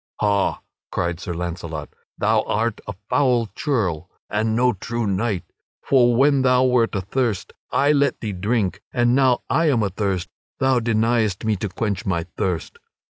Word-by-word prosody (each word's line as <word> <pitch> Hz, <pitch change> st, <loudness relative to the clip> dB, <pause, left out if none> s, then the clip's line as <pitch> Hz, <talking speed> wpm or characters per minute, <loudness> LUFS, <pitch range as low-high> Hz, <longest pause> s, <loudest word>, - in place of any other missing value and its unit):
"Ha!" 100 Hz, -2 st, +1 dB, 0.3 s
cried 85 Hz, -1 st, -1 dB
Sir 90 Hz, -1 st, -5 dB
Launcelot, 85 Hz, -3 st, -5 dB, 0.3 s
"thou -, -, +2 dB
art 110 Hz, +1 st, -1 dB
a 100 Hz, -, -5 dB
foul 125 Hz, -5 st, +2 dB
churl 95 Hz, -, -1 dB, 0.2 s
and 110 Hz, +1 st, 0 dB
no 125 Hz, +1 st, +3 dB
true 115 Hz, +4 st, -3 dB
knight. 100 Hz, -1 st, -1 dB, 0.4 s
For 120 Hz, -3 st, +4 dB
when 140 Hz, +2 st, +4 dB
thou 125 Hz, -1 st, +4 dB
wert 125 Hz, -4 st, +2 dB
athirst, 100 Hz, +2 st, -1 dB, 0.2 s
I 145 Hz, +1 st, +3 dB
let 140 Hz, -2 st, +2 dB
thee 105 Hz, -3 st, -4 dB
drink; 100 Hz, +1 st, -1 dB
and 120 Hz, -1 st, +2 dB
now 130 Hz, -2 st, +3 dB
that -, -, -2 dB
I 165 Hz, -1 st, +3 dB
am 120 Hz, -6 st, +2 dB
athirst, 95 Hz, -2 st, -1 dB, 0.3 s
thou 130 Hz, -1 st, +3 dB
deniest 115 Hz, -3 st, +1 dB
me 110 Hz, -1 st, +2 dB
to 105 Hz, +2 st, -3 dB
quench 100 Hz, +2 st, -2 dB
my 90 Hz, -6 st, -1 dB
thirst." 95 Hz, -, -3 dB
110 Hz, 160 wpm, -22 LUFS, 95-125 Hz, 0.4 s, For